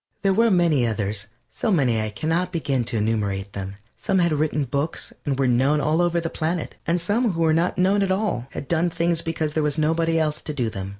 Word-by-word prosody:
There 195 -1 +3
were 230 +3 +4
many 170 - +3
others, 105 -1 -2 0.3
so - - -2
many 125 - +2
I 110 - -2
can 105 +9 -5
not 175 +3 0
begin 140 -7 0
to 115 - -2
enumerate 105 -2 -1
them. 95 0 -5 0.3
Some 195 - +1
had 170 -3 +3
written 150 -1 0
books 140 +4 -3
and 135 -2 0
were 135 -1 +2
known 135 +5 +3
all 155 +3 +1
over 175 -1 +2
the 165 - -3
planet, 165 +1 -3
and 170 +2 +2
some 205 +5 +1
who 165 - -2
were 160 -1 +4
not 170 +2 +1
known 195 +3 +3
at 195 - +1
all 190 - -1
had 140 - -7
done 170 +1 +1
things 170 0 0
because 160 -2 -2
there 155 - +1
was 150 0 0
nobody 165 +1 +1
else 155 -1 0
to 150 - -5
do 120 -5 -1
them. 95 -2 -5
155 Hz, 235 wpm, -23 LUFS, 125-170 Hz, 0.3 s, were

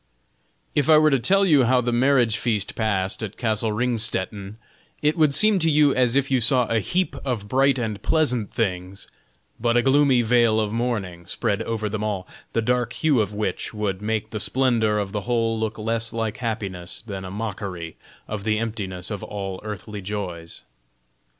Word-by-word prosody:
If 145 +1 +1
I 155 - +8
were 155 0 +5
to 135 - +3
tell 195 +10 +3
you 145 -8 +5
how 130 +2 +4
the 120 0 0
marriage 120 -2 +3
feast 105 -5 -1
passed 100 -3 -1
at 110 -2 -5
castle 110 -1 0
Ringstetten, 105 -3 -2 0.4
it 150 +1 +1
would 155 -4 +3
seem 215 +2 +4
to 165 -1 +2
you 150 -2 +4
as 125 -1 +2
if 140 0 +1
you 130 -2 +3
saw 125 +2 +4
a 115 0 +1
heap 180 - -1
of 120 -7 -3
bright 135 +4 +3
and 110 -4 -3
pleasant 125 -10 +1
things, 95 -3 -3 0.5
but 120 +1 +2
a 120 - +3
gloomy 135 -2 +4
veil 115 -1 +3
of 105 -1 -1
mourning 100 -8 -3
spread 100 +2 -1
over 110 -2 -2
them 105 +1 -3
all, 100 -4 -3 0.3
the 115 - +1
dark 125 +1 0
hue 150 -7 +2
of 105 0 -3
which 105 +1 -3
would 100 -2 -2
make 110 0 -2
the 110 - -3
splendor 115 -2 +1
of 100 -2 -2
the 105 0 -2
whole 115 -1 0
look 110 -1 -2
less 115 +1 -1
like 110 -2 -3
happiness 100 -7 -4
than 100 -3 -6
a 95 - -6
mockery 95 -5 -5 0.3
of 105 -2 -5
the 110 0 +1
emptiness 105 -5 -4
of 105 - -4
all 95 -2 -5
earthly 105 0 -6
joys. 90 -4 -5
110 Hz, 185 wpm, -23 LUFS, 105-125 Hz, 0.5 s, I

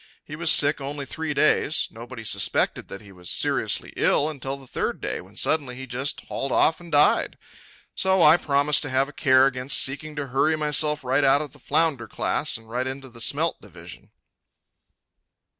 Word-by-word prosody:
He 150 - -8
was 160 0 +2
sick 145 0 +3
only 140 +1 -5
three 160 +3 -4
days. 155 +1 +1
Nobody 115 +1 -10
suspected - - 0
that 100 - -9
he 100 -2 -15
was 90 -2 -6
seriously - - -1
ill 150 - +2
until 140 -2 -5
the 135 - -13
third - - -3
day, - - -4
when - - -18
suddenly 140 -6 0
he 130 +1 -8
just 130 +3 -4
hauled 135 - -4
off 160 - +3
and 170 -1 -13
died. 145 0 +3 0.6
So 190 -2 +3
I 155 +3 +7
promised 145 -1 +2
to 145 - -4
have 130 +1 +1
a - - -13
care 130 -3 +4
against 130 0 0
seeking 150 +3 -2
to 145 -2 -5
hurry 145 +5 +2
myself 150 -1 0
right 130 +3 +1
out 140 +2 +4
of 145 - -11
the 145 - -16
flounder 145 -4 +1
class - - -1
and 115 -1 -17
right 125 +3 -3
into 135 0 -7
the 115 -1 -10
smelt - - 0
division. - - -13
140 Hz, 190 wpm, -24 LUFS, 130-150 Hz, 0.6 s, I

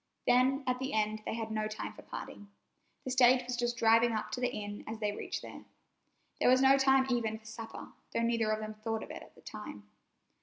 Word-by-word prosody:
Then 260 +3 +4
at 250 0 0
the 265 +1 -3
end 215 0 0
they - - -2
had 225 -1 -4
no 215 0 -1
time 215 0 -5
for - - -12
parting. 205 - -8 0.6
The 260 - -2
stage 255 0 +5
was 245 0 -2
just 240 0 -1
driving 230 0 +5
up 215 - -3
to 250 - -3
the 250 - +2
inn 205 -2 -6
as 220 - -4
they 210 -2 0
reached 205 - -5
there. - - -9 0.8
There - - +4
was 255 +1 +6
no 270 +1 +6
time 270 -1 +4
even 225 -3 0
for 220 - -22
supper, 225 +1 -8 0.2
though 230 - 0
neither 230 -2 +1
of 215 0 +1
them 215 0 -5
thought 220 +1 -3
of - - -9
it - - -7
at - - -15
the - - -18
time. 105 - -9
230 Hz, 230 wpm, -32 LUFS, 215-250 Hz, 0.8 s, was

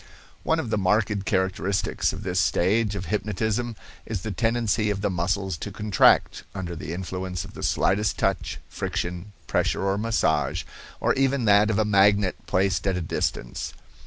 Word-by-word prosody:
One 160 0 +1
of 120 -8 -3
the 110 - +1
marked 100 +1 +1
characteristics 95 0 0
of - - -7
this 90 -1 0
stage 100 +5 +2
of 95 -2 -4
hypnotism 110 +5 -1 0.3
is 105 -5 -4
the 110 - -3
tendency 115 0 +1
of 100 -1 -2
the 100 -1 0
muscles 95 +1 -1
to - - -6
contract, 105 -3 +3
under 90 -3 -4
the 80 - -6
influence 90 0 -4
of - - -12
the - - -9
slightest 100 +2 +1
touch, - - -1
friction, 90 +3 -4
pressure - - 0
or 100 +1 +1
massage, 85 -9 +1 0.4
or - - +2
even 135 -2 +1
that 105 0 +5
of 110 - +1
a 110 - +2
magnet 100 -1 +4
placed 95 0 +1
at 95 -1 +1
a - - -2
distance. 70 -6 -3
100 Hz, 165 wpm, -25 LUFS, 90-110 Hz, 0.4 s, that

